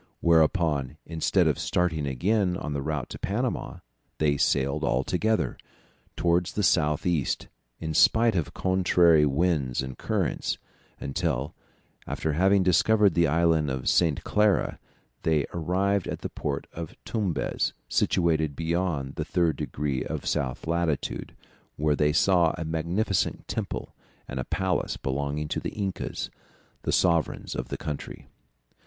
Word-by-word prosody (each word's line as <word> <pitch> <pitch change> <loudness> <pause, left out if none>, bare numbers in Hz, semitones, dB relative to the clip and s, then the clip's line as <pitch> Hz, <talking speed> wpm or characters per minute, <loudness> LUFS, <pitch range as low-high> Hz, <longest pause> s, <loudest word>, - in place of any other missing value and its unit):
Whereupon, 80 -4 +2
instead 80 -1 +1
of - - +1
starting 80 -5 0
again 90 - +1
on 75 - -4
the 70 - -2
route 75 -3 -2
to - - -8
Panama, 120 +5 -2 0.4
they 75 -2 +2
sailed 70 +1 +1
all 65 +2 +1
together, 110 +7 0 0.6
towards 85 0 +1
the 105 - -1
south 75 -5 +2
east, 85 -6 0 0.3
in 80 -1 -3
spite 115 +7 +5
of 85 -4 -1
contrary 90 -4 +4
winds 70 -4 +1
and 65 -1 -6
currents, - - -1 0.4
until, 70 -2 -2 0.5
after 80 - -2
having 95 +4 +4
discovered 100 +2 +4
the 85 +1 +3
Island 80 -1 +2
of 65 -1 -3
St. 80 -5 +3
Clara, 105 -2 +2 0.4
they 80 -3 +2
arrived 95 +3 0
at - - -4
the - - -4
port 70 -1 -3
of 85 -1 -7
Tumbez, 95 -11 -1
situated 80 -4 +1
beyond 80 -4 -1
the - - -1
3 85 -3 +1
degrees 70 -2 -3
of - - -4
south 65 -2 -1
latitude, 85 -2 -1 0.4
where 75 0 +1
they 75 +1 +2
saw 85 +1 +3
a 80 - -4
magnificent 85 +5 -1
temple - - -4 0.3
and 65 - -5
a 65 - -3
palace 95 -1 -1
belonging 70 +2 -2
to - - -1
the - - -3
Incas, 100 -3 -3 0.5
the - - -1
sovereigns 85 -4 +1
of - - -4
the - - -4
country. 75 -2 -6
80 Hz, 140 wpm, -27 LUFS, 75-90 Hz, 0.6 s, spite